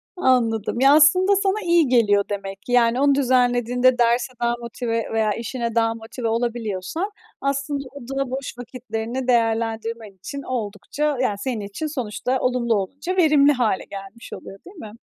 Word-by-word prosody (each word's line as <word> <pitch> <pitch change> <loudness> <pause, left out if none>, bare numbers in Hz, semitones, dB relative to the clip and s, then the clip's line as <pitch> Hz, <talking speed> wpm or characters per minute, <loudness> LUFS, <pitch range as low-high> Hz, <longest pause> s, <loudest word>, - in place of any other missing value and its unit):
Anladım. 235 - +1
Ya, 270 +2 +6
aslında 365 +6 +5
sana 395 +2 0
iyi 340 -4 +4
geliyor 210 -5 +3
demek 195 -1 -5
ki. 245 - -8
Yani, 245 +1 +3
onu 280 -1 +4
düzenlediğinde 250 -1 +2
derse 240 +1 +2
daha 235 0 +2
motive 235 -1 -3
veya 220 -1 +1
işine 235 0 -4
daha 225 -1 +2
motive 230 +1 -6
olabiliyorsan 230 - -2 0.3
aslında 275 +1 -2
o 285 - -10 0.2
da 275 -2 -1
boş 260 -2 -5
vakitlerini 245 0 -5
değerlendirmen 225 -2 0
için 195 +9 -7
oldukça, 250 +5 -3
yani, 210 -6 0
senin 235 -1 -3
için 205 +10 -5
sonuçta 255 -2 -2
olumlu 245 -2 +1
olunca 280 - -3
verimli 295 -4 +5
hâle 240 -8 0
gelmiş 200 +3 -10
oluyor, 195 - -10
değil 375 - -13
mi? 220 -9 -9
245 Hz, 155 wpm, -22 LUFS, 225-275 Hz, 0.3 s, Ya